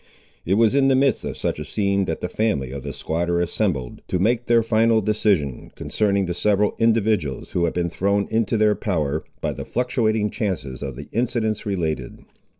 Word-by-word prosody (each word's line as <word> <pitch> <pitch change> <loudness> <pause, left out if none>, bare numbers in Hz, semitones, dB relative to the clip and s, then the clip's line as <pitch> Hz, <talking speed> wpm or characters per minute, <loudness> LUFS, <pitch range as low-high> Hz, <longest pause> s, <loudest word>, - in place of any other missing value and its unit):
It 95 - +3
was 115 +2 +4
in 140 -1 +4
the 135 - +4
midst 135 -2 +2
of - - -4
such - - -2
a - - -3
scene 100 +4 0
that 80 - -3
the - - -1
family 90 - -1
of 70 0 -5
the - - -5
squatter 85 +2 -1
assembled 85 - -1
to - - 0
make 115 +6 +1
their 115 -1 +4
final 115 0 +3
decision, 100 - 0
concerning 100 -2 0
the 90 - -2
several 105 +3 +2
individuals 110 - +1
who 85 - +1
had 85 - -2
been 85 -1 -1
thrown 100 +3 +1
into 115 0 +1
their 105 0 +4
power, 80 -8 -1 0.2
by - - -1
the - - -6
fluctuating 110 -4 0
chances 80 - -3
of 70 -3 -5
the 70 +3 -9
incidents 110 -2 -1
related. 80 -10 -2
100 Hz, 190 wpm, -22 LUFS, 85-110 Hz, 0.2 s, was